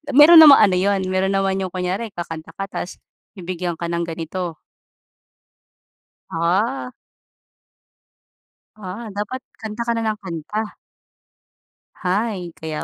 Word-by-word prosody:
Meron 320 Hz, +4 st, +10 dB
namang 295 Hz, -3 st, +9 dB
ano -, -, +1 dB
yun, 195 Hz, 0 st, +1 dB
meron 190 Hz, +1 st, +1 dB
naman 195 Hz, 0 st, +1 dB
yung 185 Hz, -2 st, -3 dB
kunyari 190 Hz, +4 st, -3 dB
kakanta 165 Hz, -2 st, -7 dB
ka 195 Hz, -, -4 dB
tas 175 Hz, -, -5 dB, 0.4 s
bibigyan 180 Hz, -1 st, -4 dB
ka 170 Hz, +1 st, -4 dB
ng 170 Hz, 0 st, -2 dB
ganito. 165 Hz, +1 st, -4 dB, 1.8 s
Ah. 195 Hz, +11 st, 0 dB, 1.8 s
Ah, 210 Hz, +2 st, -7 dB
dapat 210 Hz, +5 st, -3 dB, 0.2 s
kanta 220 Hz, +1 st, -5 dB
ka 235 Hz, -, +2 dB
ng 220 Hz, -2 st, -1 dB
kanta. 190 Hz, +5 st, -5 dB, 1.2 s
Hay, 190 Hz, -1 st, -2 dB
kaya 160 Hz, -1 st, -5 dB
190 Hz, 110 wpm, -21 LUFS, 175-215 Hz, 1.8 s, Meron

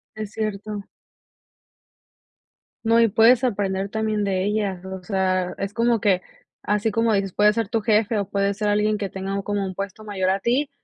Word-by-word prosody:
Es 215 Hz, -1 st, -6 dB
cierto. 210 Hz, -1 st, -4 dB, 2.0 s
No, 230 Hz, 0 st, +4 dB
y 230 Hz, -, +4 dB
puedes 230 Hz, +4 st, +5 dB
aprender 200 Hz, -4 st, -1 dB
también 215 Hz, 0 st, -1 dB
de 190 Hz, -1 st, 0 dB
ella, 205 Hz, -3 st, -1 dB
o 190 Hz, -1 st, -7 dB
sea, 185 Hz, -2 st, 0 dB
es 195 Hz, +1 st, -4 dB
como 230 Hz, -1 st, +2 dB
que, 190 Hz, -3 st, +2 dB, 0.4 s
así 210 Hz, +2 st, 0 dB
como 225 Hz, +1 st, +2 dB
dices, 195 Hz, -2 st, 0 dB
puede 210 Hz, 0 st, +5 dB
ser 225 Hz, 0 st, -1 dB
tu 225 Hz, +1 st, -1 dB
jefe 215 Hz, 0 st, +2 dB
o 200 Hz, -2 st, -2 dB
puede 200 Hz, 0 st, +1 dB
ser 210 Hz, +1 st, -1 dB
alguien 210 Hz, +1 st, +2 dB
que 200 Hz, -2 st, -3 dB
tenga 195 Hz, +1 st, -3 dB
como 205 Hz, 0 st, -1 dB
un 185 Hz, -1 st, -5 dB
puesto 200 Hz, +2 st, -6 dB
mayor 190 Hz, -3 st, -1 dB
a 190 Hz, +1 st, +1 dB
ti, 255 Hz, +7 st, +1 dB
205 Hz, 185 wpm, -23 LUFS, 195-220 Hz, 2.0 s, puedes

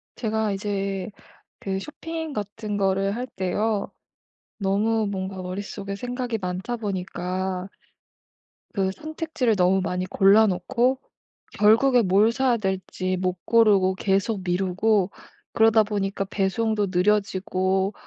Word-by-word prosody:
제가 220 Hz, -2 st, -1 dB
이제 195 Hz, -1 st, -2 dB, 0.5 s
그 190 Hz, -1 st, -3 dB
쇼핑 320 Hz, +5 st, -6 dB
같은 210 Hz, -1 st, -4 dB
거를 195 Hz, +1 st, +1 dB
할 250 Hz, +1 st, -4 dB
때요. 200 Hz, +2 st, -1 dB, 0.7 s
너무 215 Hz, +2 st, +1 dB
뭔가 190 Hz, -1 st, -4 dB
머릿속에 200 Hz, +2 st, -5 dB
생각이 245 Hz, +1 st, -3 dB
많다 185 Hz, +5 st, -3 dB
보니까 185 Hz, -2 st, -3 dB, 1.1 s
그 190 Hz, -3 st, +1 dB
선택지를 310 Hz, -, -2 dB
너무 190 Hz, 0 st, +3 dB
많이 180 Hz, 0 st, -2 dB
골라놓고 215 Hz, +7 st, +3 dB, 0.6 s
결국에 235 Hz, +4 st, +5 dB
뭘 200 Hz, +2 st, +4 dB
사야 250 Hz, 0 st, +2 dB
될지 190 Hz, -2 st, -2 dB
못 185 Hz, -1 st, -2 dB
고르고 205 Hz, -5 st, +4 dB
계속 195 Hz, +2 st, 0 dB
미루고 190 Hz, +2 st, +1 dB, 0.4 s
그러다 225 Hz, -1 st, +5 dB
보니까 200 Hz, -1 st, -2 dB
배송도 205 Hz, +2 st, 0 dB
느려지고 190 Hz, 0 st, +1 dB
200 Hz, 240 characters per minute, -24 LUFS, 190-220 Hz, 1.1 s, 결국에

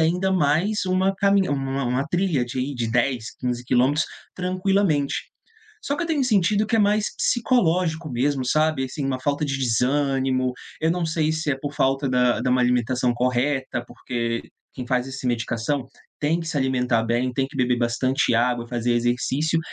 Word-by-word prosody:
ainda 180 Hz, +4 st, +2 dB
mais 185 Hz, +5 st, +1 dB
uma 185 Hz, +1 st, +2 dB
camin 200 Hz, -1 st, +3 dB
uma 135 Hz, -1 st, -1 dB
uma 125 Hz, +4 st, 0 dB
trilha 175 Hz, -7 st, +1 dB
de 120 Hz, +1 st, -6 dB
aí 135 Hz, +3 st, -2 dB
de 120 Hz, -2 st, -2 dB
10, 120 Hz, -1 st, 0 dB
15 125 Hz, -1 st, -3 dB
quilômetros 130 Hz, +5 st, +2 dB, 0.3 s
tranquilamente. 185 Hz, -5 st, +1 dB, 0.7 s
Só 285 Hz, -, -2 dB
que 345 Hz, -, -2 dB
eu -, -, -4 dB
tenho 310 Hz, -4 st, +1 dB
sentido 210 Hz, -2 st, +2 dB
que 225 Hz, -, +1 dB
é -, -, +2 dB
mais 210 Hz, 0 st, +3 dB
psicológico 175 Hz, -, +1 dB
mesmo, 130 Hz, +2 st, 0 dB
sabe. 155 Hz, 0 st, +2 dB
Assim, 135 Hz, +2 st, -5 dB
uma 130 Hz, -1 st, -1 dB
falta 145 Hz, +3 st, 0 dB
de 135 Hz, -1 st, -1 dB
desânimo. 130 Hz, +1 st, +1 dB, 0.3 s
Eu 160 Hz, -, +2 dB
não 170 Hz, -1 st, 0 dB
sei 155 Hz, -1 st, 0 dB
se 160 Hz, -1 st, -1 dB
é 135 Hz, -, 0 dB
por 145 Hz, 0 st, -4 dB
falta 135 Hz, +1 st, +1 dB
da 125 Hz, -1 st, +2 dB
da 125 Hz, +1 st, 0 dB
má 125 Hz, 0 st, +3 dB
alimentação 125 Hz, 0 st, +1 dB
correta, 125 Hz, +1 st, 0 dB
porque 115 Hz, -2 st, -3 dB, 0.3 s
quem 125 Hz, -2 st, -6 dB
faz 125 Hz, +1 st, 0 dB
esse 135 Hz, -1 st, -6 dB
medicação 120 Hz, +3 st, -1 dB, 0.3 s
tem 155 Hz, +3 st, +1 dB
que 165 Hz, -, -6 dB
se 160 Hz, -, -3 dB
alimentar 125 Hz, -3 st, +1 dB
bem, 120 Hz, +2 st, 0 dB
tem 135 Hz, +2 st, 0 dB
que 140 Hz, -, -11 dB
beber 125 Hz, -1 st, +1 dB
bastante 125 Hz, +2 st, +1 dB
água, 120 Hz, 0 st, +1 dB
fazer 120 Hz, 0 st, 0 dB
exercício. 130 Hz, +7 st, 0 dB
135 Hz, 180 wpm, -23 LUFS, 125-165 Hz, 0.7 s, camin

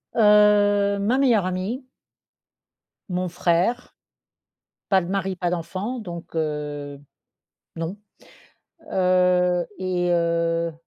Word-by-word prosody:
Heu, 205 Hz, -2 st, +4 dB
ma 225 Hz, +6 st, +1 dB
meilleure 235 Hz, -8 st, +3 dB
amie 190 Hz, +8 st, -3 dB, 1.3 s
mon 180 Hz, 0 st, -1 dB
frère. 175 Hz, +7 st, 0 dB, 1.0 s
Pas 190 Hz, -1 st, +5 dB
de 170 Hz, -, -6 dB
mari, 195 Hz, -1 st, -2 dB
pas 175 Hz, -1 st, -2 dB
d'enfant 185 Hz, +8 st, -4 dB
donc 170 Hz, -5 st, -9 dB
heu, 145 Hz, -2 st, -4 dB, 0.8 s
non, 165 Hz, +4 st, -4 dB, 1.0 s
heu, 180 Hz, -1 st, +2 dB
et 180 Hz, -1 st, -1 dB
heu 170 Hz, 0 st, 0 dB
180 Hz, 95 wpm, -23 LUFS, 170-205 Hz, 1.3 s, Pas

